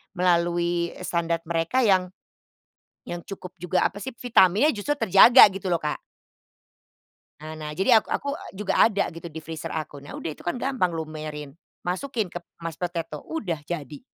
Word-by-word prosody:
melalui, 175 -1 +1
eee, - - -9
standar 170 -1 -1
mereka 170 +10 0
yang 190 -4 +3 1.0
yang 175 - -5
cukup 185 0 -9
juga 180 +1 +1
apa 205 - -2
sih 240 +4 -7
vitaminnya 235 - +4
justru 255 +7 -2
terjaga 235 +3 +8
gitu 195 0 -5
loh, 175 - +2
Kak. 150 -2 -3 1.4
Nah 155 +1 -7
nah, 150 -1 -5
jadi 220 +8 +5
ak - - -7
aku 280 - -2 0.2
juga 200 +1 -1
ada 200 -3 +3
gitu, 165 0 -9
di 160 -1 -8
freezer 160 0 -6
aku. 155 -2 -5
Nah 140 +1 -11
udah - - -4
itu - - -16
kan, 175 - 0
gampang 245 -9 -1
lumerin. 155 -2 -6 0.3
Masukin 210 +2 -2
ke 175 - -5 0.2
mashed 165 -1 -5
potato. 165 -4 -4
Udah 195 - -3
jadi. 150 -4 -6
175 Hz, 165 wpm, -25 LUFS, 165-200 Hz, 1.4 s, terjaga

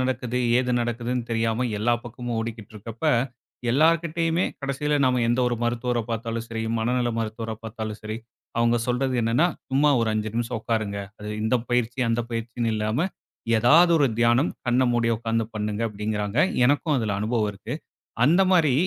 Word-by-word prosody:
நடக்குது, 125 -1 -1 0.2
ஏது 125 -1 0
நடக்குதுன்னு, 120 +1 -2
தெரியாம 115 +2 0
எல்லா 120 +3 +2
பக்கமும் 120 0 -5
ஓடிக்கிட்டு 110 -2 -5
இருக்கறப்ப 115 +6 -8 0.7
எல்லார்கிட்டயுமே 165 +3 +2 0.2
கடைசில 145 +2 -1
நாம 125 -1 +2
எந்த 120 +2 +1
ஒரு 120 - 0
மருத்துவர 120 0 0
பார்த்தாலும் 115 0 -3
சரி, 115 -1 -3 0.2
மனநல 120 +2 +1
மருத்துவர 110 0 -3
பார்த்தாலும் 110 -1 -6
சரி, 110 +1 -4 0.4
அவங்க 115 0 +3
சொல்றது 130 +1 0
என்னன்னா, 115 +9 +3 0.2
சும்மா 145 +3 +4
ஒரு 115 - +1
5 110 0 -1
நிமிஷம் 115 -1 -1
உக்காருங்க, 110 -3 -1 0.2
அது 105 0 -6
இந்த 110 +3 +2
பயிற்சி, 120 +1 0
அந்த 115 +1 +1
பயிற்சினு 115 0 -2
இல்லாம 110 +10 0 0.5
ஏதாவது 160 +10 +6
ஒரு 145 - +4
தியானம் 120 +5 +3 0.2
கண்ண 125 +2 +3
மூடி 120 -1 +1
உக்கார்ந்து 115 0 -1
பண்ணுங்க 105 +1 -2
அப்டிங்கறாங்க. 105 +2 -3 0.3
எனக்கும் 145 +3 +2
அதுல 110 -3 -1
அனுபவம் 110 -1 0
இருக்கு 95 - -6 0.5
அந்த 170 +8 +5
மாரி 165 -7 +4
120 Hz, 155 wpm, -25 LUFS, 110-125 Hz, 0.7 s, ஏதாவது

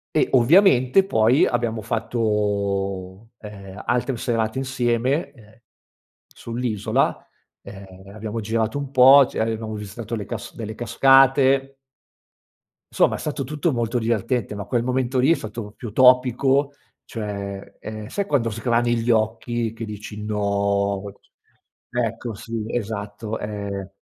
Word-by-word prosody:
E - - +4
ovviamente 130 - +5
poi 120 - +3
abbiamo 115 -2 -1
fatto, 100 -3 -2
ehm, 100 -2 -10
altre 120 +1 0
serate 115 0 -1
insieme, 130 +2 0
ehm, 110 -3 -20 0.7
sull'isola, 115 -3 -2 0.3
ehm, 95 0 -12
abbiamo 110 +1 -5
girato 110 +4 -1
un 140 -2 -5
po', 135 +1 +8
c - - -15
avevamo 110 -1 -2
visitato 105 +2 -6
le 105 - -4
casc 115 -4 -7
delle 110 -1 -6
cascate. 135 +2 +4 1.2
Somma, - - +3
è - - -9
stato 145 -2 -3
tutto 150 +5 -1
molto 120 +1 -1
divertente, 115 0 -1
ma 100 -1 -5
quel 120 +2 0
momento 130 +1 -1
lì 130 +5 +4
è - - +6
stato 110 -4 -7
più 115 -3 -9
topico, 130 +3 +4 0.3
cioè, 100 -3 -6
ehm, 110 0 -7
sai 200 - -2
quando 135 -9 +1
sgrani 120 +2 0
gli 115 +1 -1
occhi 115 +1 0
che 115 - -6
dici: 105 0 -8
"No!" 100 -1 0 0.9
Ecco, 115 -1 -3
sì, 115 +2 -5
esatto, 110 -1 -4
ehm 100 -2 -5
115 Hz, 125 wpm, -22 LUFS, 105-125 Hz, 1.2 s, po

